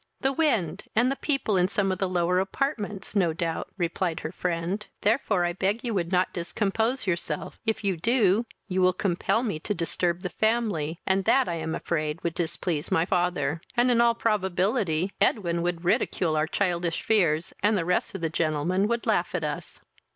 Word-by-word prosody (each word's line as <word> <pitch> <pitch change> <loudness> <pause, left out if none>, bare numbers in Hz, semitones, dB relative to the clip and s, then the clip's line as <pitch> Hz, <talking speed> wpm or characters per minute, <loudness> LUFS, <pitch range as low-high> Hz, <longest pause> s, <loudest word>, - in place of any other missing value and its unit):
"The 270 0 +1
wind, 200 - 0
and 245 +4 +3
the - - -1
people 275 -9 0
in 180 0 +4
some 195 0 0
of 185 - -3
the 190 - 0
lower 180 0 +2
apartments; 205 -1 -3
no 175 -5 +3
doubt, 165 0 -2
(replied 170 -1 -1
her 155 - -4
friend;) 180 +3 -2 0.2
therefore 205 -5 +2
I 175 - -1
beg 200 +5 -1
you 235 -2 -2
would 175 -3 -1
not 180 0 +2
discompose 220 +8 -1
yourself; 170 -4 -2
if 220 -1 0
you 195 -3 0
do, 225 +2 +2 0.2
you 185 -2 0
will 185 0 +4
compel 190 +5 0
me 205 -10 -2
to 205 - -2
disturb 170 +1 -1
the 180 - -2
family, 210 -9 0
and 190 0 +1
that 265 -2 +4
I 170 - -2
am 160 0 -3
afraid 155 -1 -2
would 170 - -1
displease 165 -2 -2
my 165 - +2
father; 175 -3 0 0.2
and, 245 +1 +4
in 235 -1 +4
all 235 -1 +4
probability, 190 -4 0
Edwin 170 -5 +2
would 175 0 -2
ridicule 170 -2 +1
our 155 +1 +1
childish 175 -3 -1
fears, 175 -6 +2
and 210 +1 +3
the 170 - -1
rest 180 +2 0
of 190 - -5
the 165 - 0
gentlemen 170 +5 +1
would 235 +1 -1
laugh 185 -6 +1
at 170 - -1
us." 150 -1 -5
185 Hz, 190 wpm, -26 LUFS, 170-210 Hz, 0.2 s, in